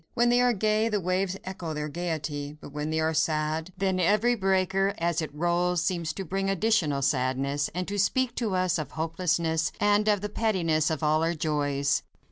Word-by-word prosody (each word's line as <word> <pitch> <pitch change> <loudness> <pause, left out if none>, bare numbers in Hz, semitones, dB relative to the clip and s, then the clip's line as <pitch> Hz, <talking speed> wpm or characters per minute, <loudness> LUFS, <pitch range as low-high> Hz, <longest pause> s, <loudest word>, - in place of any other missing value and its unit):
When 240 +1 +3
they 245 +1 +4
are 245 0 +4
gay, 215 +1 +1
the 210 -2 0
waves 185 +1 -1
echo 180 -4 -5
their 150 0 -3
gaiety; 150 -3 -4
but - - -11
when 150 +1 -3
they 160 0 0
are 160 0 +1
sad, 155 +2 0
then 190 -1 0
every 210 +7 +3
breaker, 195 -1 +1
as 170 -1 0
it 155 - -4
rolls, 175 +2 0
seems 170 -3 -1
to 195 - -5
bring 195 +3 -1
additional 190 -9 +1
sadness, 135 +2 0
and 180 0 -2
to 205 0 -3
speak 255 +5 +1
to 220 -6 -1
us 185 -3 +1
of 155 - -6
hopelessness 165 0 0
and 205 +1 +3
of 205 -2 +3
the 210 - -2
pettiness 175 -9 +1
of 160 -1 -3
all 155 +1 +3
our 165 +1 0
joys. 145 -3 0
175 Hz, 195 wpm, -27 LUFS, 155-195 Hz, -, they